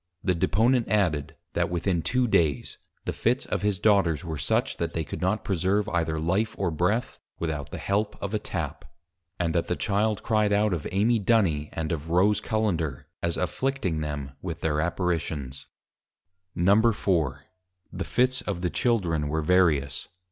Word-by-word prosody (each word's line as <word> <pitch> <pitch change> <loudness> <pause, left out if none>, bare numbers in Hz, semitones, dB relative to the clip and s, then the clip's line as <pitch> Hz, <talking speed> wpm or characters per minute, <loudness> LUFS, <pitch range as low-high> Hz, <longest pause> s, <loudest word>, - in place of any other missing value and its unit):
_ - - -58 0.2
The 90 - +2
Deponent 115 +8 +2
added, 90 -9 +1 0.2
that - - +1
within 85 0 0
Two 125 +7 +1
Days, 75 - +1 0.3
the - - -2
Fits - - 0
of - - -2
his 100 -2 0
Daughters 95 -7 +3
were 80 -1 -3
such, - - 0
that 85 -1 -2
they 80 - -1
could 75 - -7
not 95 +3 0
preserve 100 +3 +1
either 80 -3 0
Life 95 +7 0
or 95 -3 0
Breath, 90 +9 0 0.2
without 75 -4 -3
the - - -6
help 105 +2 -1
of 100 +1 -4
a 105 - +1
Tap. 80 -8 -4 0.6
And 85 -2 0
that 85 - 0
the 90 - 0
Children 105 +3 +1
Cry'd 105 -2 +2
out 105 -1 +3
of 80 -4 -3
Amy 110 +4 +3
Duny, 95 -9 +2
and 80 +1 -3
of 80 -1 -3
Rose 95 +5 +3
Cullender, 85 - -1 0.2
as 85 -1 0
afflicting 95 - -1
them 75 -3 -4
with 85 -3 -5
their 75 -1 +1
Apparitions. 80 -6 -2 0.9
IV. 85 - 0
The 95 -3 0
Fits 125 +4 +1
of 95 -4 -3
the 90 -2 -1
Children 90 - +1
were 80 +2 -1
various. 75 -6 +2
90 Hz, 170 wpm, -26 LUFS, 80-105 Hz, 0.9 s, Daughters